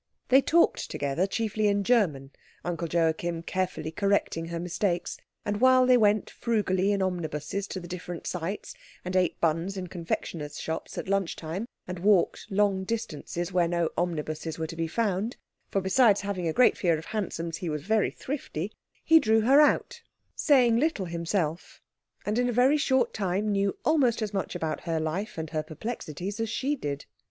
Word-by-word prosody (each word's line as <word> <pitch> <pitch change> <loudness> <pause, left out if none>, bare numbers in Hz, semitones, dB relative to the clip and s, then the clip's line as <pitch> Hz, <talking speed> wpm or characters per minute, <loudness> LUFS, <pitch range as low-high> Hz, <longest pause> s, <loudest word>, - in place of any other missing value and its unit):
They 265 +2 +7
talked 335 +4 +2
together 145 +7 -1
chiefly 215 0 0
in 200 0 +2
German, 165 - +1 0.3
Uncle 170 -1 -2
Joachim 165 0 0
carefully 185 -4 -2
correcting 200 -3 0
her 170 0 -4
mistakes; 175 +1 -1 0.3
and 205 0 -2
while 255 0 +6
they 250 0 +6
went 210 -3 +3
frugally 205 -4 +1
in 200 -1 +1
omnibuses 175 +1 -3
to 190 - -5
the 175 - -9
different 175 -1 -6
sights, 180 +3 -4 0.3
and 180 +1 -3
ate 180 -2 +2
buns 170 +4 0
in 185 - -3
confectioners' 165 -3 -4
shops 160 - -5
at - - -4
lunch 195 -3 0
time, 175 +8 -5 0.2
and 180 -1 -5
walked 195 0 +2
long 195 -1 +2
distances 175 -4 -4
where 175 -2 +3
no 170 -1 0
omnibuses 160 -2 -2
were 160 - -2
to 165 - -7
be 165 0 -1
found 210 +4 -1 0.3
for 195 - 0
besides 205 +2 +4
having 195 -4 -2
a - - +1
great 250 +10 +5
fear 170 -4 +2
of 160 - -8
hansoms 170 -6 -3
he 175 - -4
was 150 -2 -3
very 215 +3 +2
thrifty 215 - -5 0.3
he 325 0 +7
drew 220 -4 +3
her 270 +6 +6
out, 300 - +2 0.3
saying 250 -6 +4
little 275 - +1
himself, 170 -1 -2 0.5
and 210 +3 0
in 245 0 +2
a - - +1
very 250 +5 +4
short 265 -3 +2
time 200 +1 -1
knew 200 -1 0
almost 260 -8 +3
as 210 -1 -4
much 195 -2 -2
about 160 -3 -2
her 165 -2 -1
life 165 +7 -3
and 160 -1 -4
her 155 -2 0
perplexities 180 +2 -5
as 225 -1 -1
she 270 +6 0
did. 145 - -4
185 Hz, 180 wpm, -27 LUFS, 165-215 Hz, 0.5 s, They